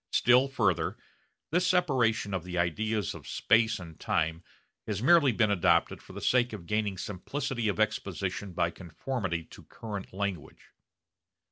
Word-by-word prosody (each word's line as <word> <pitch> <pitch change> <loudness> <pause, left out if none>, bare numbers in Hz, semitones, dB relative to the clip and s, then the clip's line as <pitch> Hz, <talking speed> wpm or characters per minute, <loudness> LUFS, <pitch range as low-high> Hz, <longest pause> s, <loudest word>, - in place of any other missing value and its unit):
Still 125 +2 +4
further, 105 -10 0 0.5
this 180 +2 +2
separation 130 - +2
of 95 -3 -2
the 90 0 -5
ideas 105 +4 0
of - - -11
space 110 0 +2
and 85 -4 -11
time 80 +2 -1 0.4
has 105 -3 -2
merely 155 -2 +6
been 110 -2 +2
adopted 85 -3 +2
for - - -14
the - - -6
sake 125 -2 +2
of 95 -5 -7
gaining 105 -1 -1
simplicity 120 +6 -3
of 105 - -1
exposition 100 -2 -2
by 85 0 0
conformity 90 +1 -4
to - - -14
current 105 -4 -7
language. 95 -5 -5
105 Hz, 145 wpm, -29 LUFS, 90-120 Hz, 0.5 s, merely